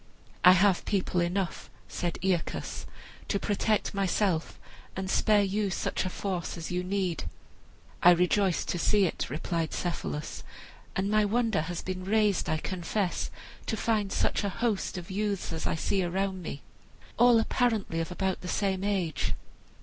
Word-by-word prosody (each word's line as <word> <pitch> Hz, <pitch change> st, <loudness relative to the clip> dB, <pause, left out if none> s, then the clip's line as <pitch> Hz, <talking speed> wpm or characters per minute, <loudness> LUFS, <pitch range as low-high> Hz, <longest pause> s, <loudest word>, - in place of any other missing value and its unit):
"I 180 Hz, -, +10 dB
have 190 Hz, 0 st, +4 dB
people 185 Hz, -3 st, 0 dB
enough," 175 Hz, +1 st, -2 dB, 0.2 s
said 175 Hz, -2 st, -3 dB
Aeacus, 185 Hz, -4 st, -1 dB, 0.4 s
"to 200 Hz, -, +1 dB
protect 210 Hz, +2 st, 0 dB
myself 195 Hz, -3 st, 0 dB, 0.4 s
and 190 Hz, 0 st, -3 dB
spare 210 Hz, -1 st, +4 dB
you 200 Hz, +1 st, 0 dB
such 190 Hz, -, -1 dB
a -, -, 0 dB
force 180 Hz, -2 st, -3 dB
as 165 Hz, 0 st, -5 dB
you 180 Hz, 0 st, -1 dB
need." 185 Hz, -3 st, -1 dB, 0.8 s
"I 175 Hz, -, +8 dB
rejoice 180 Hz, +1 st, +3 dB
to 175 Hz, -, -2 dB
see 205 Hz, +2 st, +4 dB
it," 170 Hz, -, -2 dB
replied 160 Hz, +2 st, -2 dB
Cephalus, 170 Hz, -3 st, -3 dB, 0.5 s
"and 195 Hz, +2 st, 0 dB
my 215 Hz, 0 st, +4 dB
wonder 220 Hz, -3 st, +1 dB
has 170 Hz, +2 st, -4 dB
been 185 Hz, 0 st, -4 dB
raised, 210 Hz, -1 st, +2 dB
I 160 Hz, -, +1 dB
confess, 185 Hz, +3 st, -2 dB, 0.4 s
to 220 Hz, -, -1 dB
find 210 Hz, -3 st, 0 dB
such -, -, +1 dB
a 200 Hz, -, 0 dB
host 215 Hz, -2 st, -1 dB
of 180 Hz, +2 st, -7 dB
youths 200 Hz, -3 st, -1 dB
as 160 Hz, -, -2 dB
I -, -, 0 dB
see 190 Hz, +4 st, 0 dB
around 190 Hz, +1 st, -1 dB
me, 145 Hz, -4 st, -6 dB, 0.6 s
all 240 Hz, -1 st, +7 dB
apparently 225 Hz, -7 st, +1 dB
of 165 Hz, -, -2 dB
about 190 Hz, +1 st, -1 dB
the 180 Hz, -, -6 dB
same 190 Hz, +1 st, 0 dB
age. 180 Hz, -, 0 dB
190 Hz, 155 wpm, -29 LUFS, 175-205 Hz, 0.8 s, I